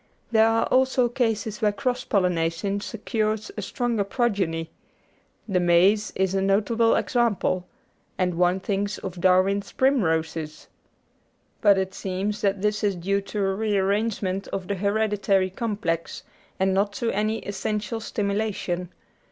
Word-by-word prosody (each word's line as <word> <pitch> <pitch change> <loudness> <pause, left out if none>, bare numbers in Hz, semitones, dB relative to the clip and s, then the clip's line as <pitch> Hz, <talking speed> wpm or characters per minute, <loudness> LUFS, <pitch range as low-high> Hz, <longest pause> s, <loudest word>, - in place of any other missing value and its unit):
There 220 -1 +5
are 225 0 +2
also 260 -1 +3
cases 225 -3 -1
where 210 -1 +3
cross 250 +3 -2
pollination 180 0 0
secures 215 -1 -2
a 210 - -4
stronger 235 +1 -1
progeny; 195 -7 -1 0.8
the 190 -4 +1
maize 180 +5 +3
is 190 0 +1
a 195 - +1
notable 215 +4 +2
example, 205 -7 0 0.5
and 180 -1 +1
one 180 +2 +2
thinks 200 +1 -2
of 180 -2 -7
Darwin's 190 +2 +3
primroses. 160 - 0 1.0
But 200 -2 +5
it 190 0 -1
seems 195 +3 -3
that 195 -1 0
this 210 0 0
is 200 -2 +1
due 195 +3 0
to 200 0 -2
a 195 - +1
re 210 0 0
arrangement 195 -1 0
of 190 -2 -5
the 200 - -1
hereditary 200 -1 +1
complex, 190 -6 -3 0.4
and 190 0 +2
not 200 +1 +1
to 230 +2 -1
any 215 +2 0
essential 210 +2 -3
stimulation. 200 -4 -2
200 Hz, 135 wpm, -25 LUFS, 185-215 Hz, 1.0 s, There